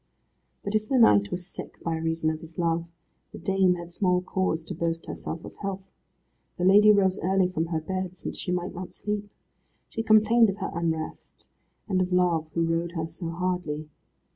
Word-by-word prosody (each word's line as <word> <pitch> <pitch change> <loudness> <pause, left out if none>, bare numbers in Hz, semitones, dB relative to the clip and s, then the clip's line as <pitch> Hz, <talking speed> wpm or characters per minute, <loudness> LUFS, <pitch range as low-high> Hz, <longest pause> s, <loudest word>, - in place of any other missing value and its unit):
But 200 - -3
if 215 0 0
the 265 - +3
knight 100 - +6
was 180 0 -4
sick 195 - -9
by 165 -1 -1
reason 160 0 0
of 155 - -5
his 165 0 -12
love, 170 -1 +1 0.5
the - - -9
dame 190 -2 +2
had 170 0 -8
small 180 0 +1
cause 185 -3 -1
to 175 - -6
boast 165 0 -2
herself 165 - -6
of - - -10
health. 195 -1 -4 0.7
The 180 - -2
lady 205 +3 +8
rose 195 -2 +3
early 190 +1 +2
from 165 -2 -1
her 165 -1 -1
bed, 185 +2 -4
since - - -5
she 180 - -3
might 180 0 -2
not 180 0 -7
sleep. 210 0 -3 0.6
She 225 - -3
complained 220 +1 +5
of 195 - -3
her 195 - -3
unrest, 160 -2 -4 0.4
and 185 -3 +1
of 185 0 -1
Love 175 -3 +2
who 170 - +2
rode 165 +1 -1
her 160 -2 -2
so 165 +1 -6
hardly. 170 -3 -2
180 Hz, 190 wpm, -27 LUFS, 165-195 Hz, 0.7 s, lady